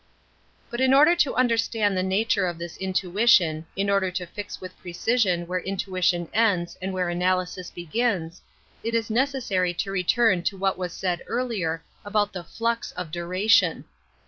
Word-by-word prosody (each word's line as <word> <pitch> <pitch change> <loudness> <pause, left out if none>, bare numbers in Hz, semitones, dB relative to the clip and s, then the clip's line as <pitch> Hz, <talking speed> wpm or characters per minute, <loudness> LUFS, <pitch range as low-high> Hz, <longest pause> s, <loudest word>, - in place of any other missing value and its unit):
But 240 +1 -3
in 260 0 +5
order 305 +5 +6
to 305 -6 +2
understand 230 -4 +1
the 185 - +1
nature 195 +1 +1
of 175 -1 -4
this 170 0 -7
intuition, 185 -3 +2
in 195 +1 0
order 195 -1 +2
to 180 0 -4
fix 205 +4 -7
with 185 -1 -9
precision 180 0 0
where 180 +1 -2
intuition 185 -2 -1
ends 200 -6 +2
and 190 +1 -3
where 185 -1 -1
analysis 180 +1 -1
I - - -30
begins, 175 -1 -2 0.4
it 230 +1 -1
is 225 -1 -1
necessary 230 -8 0
to 195 +3 -2
return 195 +1 +2
to 195 - -1
what 190 0 0
was 180 -1 -3
said 175 0 -2
earlier 200 -10 -2 0.2
about 205 0 0
the 180 -2 -5
flux 230 +5 -2
of 180 -3 -6
duration. 180 +2 +2
190 Hz, 165 wpm, -25 LUFS, 180-225 Hz, 0.4 s, order